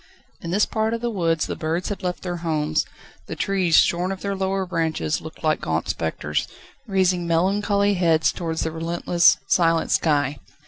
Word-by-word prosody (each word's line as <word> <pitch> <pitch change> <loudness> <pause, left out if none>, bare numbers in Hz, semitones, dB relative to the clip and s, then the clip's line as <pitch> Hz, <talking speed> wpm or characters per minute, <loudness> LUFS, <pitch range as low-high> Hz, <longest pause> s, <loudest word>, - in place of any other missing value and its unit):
In 170 - -6
this 200 +4 +3
part 220 +1 -1
of 230 - -6
the 240 0 -1
woods 165 -5 0
the - - -4
birds 165 +3 -2
had 205 - -4
left 180 -1 -3
their 175 -1 -3
homes; 155 -2 0 0.4
the - - -5
trees, 185 -5 +1
shorn 180 +2 +3
of 195 - -6
their 200 0 -2
lower 190 0 -1
branches 160 -3 -1
looked 160 +1 -11
like 155 -1 +1
gaunt - - -2
spectres, - - -2 0.4
raising 185 -3 +1
melancholy 200 +4 +2
heads 165 -4 +2
towards 165 -2 -3
the 160 - -2
relentless, 170 +1 +2
silent 165 -2 +2
sky. 145 -3 +1
175 Hz, 175 wpm, -23 LUFS, 160-195 Hz, 0.4 s, this